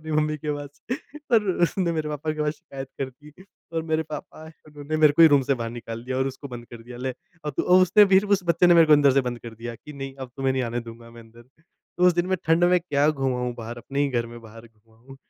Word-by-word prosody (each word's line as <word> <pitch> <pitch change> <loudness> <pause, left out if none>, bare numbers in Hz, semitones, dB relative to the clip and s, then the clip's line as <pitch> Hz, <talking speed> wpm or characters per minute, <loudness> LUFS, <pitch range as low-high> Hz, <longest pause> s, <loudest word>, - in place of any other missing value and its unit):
अपनी 155 0 -6
मम्मी 155 0 +1
के 150 0 -3
पास 145 0 -10 0.5
और 220 -3 +4
उसने 175 0 0
मेरे 155 -1 -2
पापा 150 +1 -3
के 155 - -6
पास 150 0 0
शिकायत 135 -2 -9
कर 135 -1 -2
दी। 150 0 -14 0.4
और 165 -1 -1
मेरे 160 0 +2
पापा 155 +1 -8
आए, 160 - -12 0.2
उन्होंने 150 +1 -5
मेरे 155 -2 +6
को 165 - +6
ही 160 - +10
रूम 140 -2 +4
से 140 - +1
बाहर 115 -2 -4
निकाल 115 -1 -7
दिया 130 +1 -3
और 130 - +1
उसको 135 +2 -9
बंद 120 -2 -9
कर 115 -1 -10
दिया, 120 +1 -11
"ले, 130 +1 -2 0.3
अब 150 - -3
तू" - - +1
और 185 - +7
उसने 185 +4 +6
फिर, 195 +2 +5
उस 200 -2 +2
बच्चे 170 +1 +3
ने 175 - +6
मेरे 165 -1 +7
को 155 - +5
अंदर 145 -2 +6
से 135 - +4
बंद 120 - -7
कर 115 -1 -9
दिया 115 +1 -7
कि, 150 +6 -12
"नहीं, 135 -1 -7
अब 130 -2 -8
तुम्हें 135 -1 0
नहीं 130 -1 -1
आने 120 0 -2
दूँगा 115 0 -12
मैं 115 0 -13
अंदर।" 115 +1 -17 0.2
तो 175 +2 -3
उस 180 - +6
दिन 175 0 0
मैं 185 0 0
ठंड 165 +2 +3
में 180 +1 +4
क्या 145 -3 +1
घुमा 135 -4 -1
हूँ 125 -1 -2
बाहर, 115 +1 -7
अपने 140 +4 -4
ही 145 - +2
घर 120 -3 -1
में 120 - -10
बाहर 115 +1 -13
घुमा 110 0 -27
हूँ। 135 +4 -15
140 Hz, 285 wpm, -24 LUFS, 120-160 Hz, 0.5 s, ही